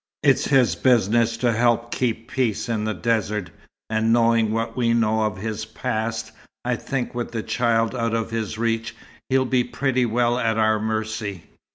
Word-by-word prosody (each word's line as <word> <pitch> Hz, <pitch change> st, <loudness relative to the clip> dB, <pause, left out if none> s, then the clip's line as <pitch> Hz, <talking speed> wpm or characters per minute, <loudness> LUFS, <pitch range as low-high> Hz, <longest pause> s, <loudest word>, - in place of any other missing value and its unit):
It's 140 Hz, -2 st, +4 dB
his 125 Hz, -, +4 dB
business 115 Hz, +2 st, +2 dB
to 120 Hz, 0 st, +1 dB
help 120 Hz, +1 st, +1 dB
keep 115 Hz, -2 st, -1 dB
peace 120 Hz, -6 st, 0 dB
in 110 Hz, -2 st, -1 dB
the 110 Hz, -, -1 dB
desert, 105 Hz, -5 st, -1 dB, 0.4 s
and 110 Hz, +1 st, +1 dB
knowing 115 Hz, -2 st, +3 dB
what 115 Hz, +1 st, -2 dB
we 115 Hz, -2 st, +2 dB
know 110 Hz, -1 st, +2 dB
of 105 Hz, -1 st, -1 dB
his 110 Hz, +2 st, -4 dB
past, 110 Hz, 0 st, -3 dB, 0.3 s
I 125 Hz, 0 st, +1 dB
think 125 Hz, +1 st, -3 dB
with 120 Hz, 0 st, -4 dB
the 110 Hz, -2 st, -2 dB
child 115 Hz, -2 st, +1 dB
out 115 Hz, -2 st, -1 dB
of 115 Hz, -1 st, -2 dB
his 110 Hz, -1 st, -3 dB
reach 115 Hz, 0 st, -1 dB, 0.3 s
he'll 130 Hz, 0 st, +3 dB
be 125 Hz, -1 st, +2 dB
pretty 125 Hz, 0 st, 0 dB
well 120 Hz, +1 st, +1 dB
at 115 Hz, -2 st, 0 dB
our 110 Hz, -1 st, +3 dB
mercy." 110 Hz, -3 st, -3 dB
115 Hz, 175 wpm, -23 LUFS, 110-120 Hz, 0.4 s, It's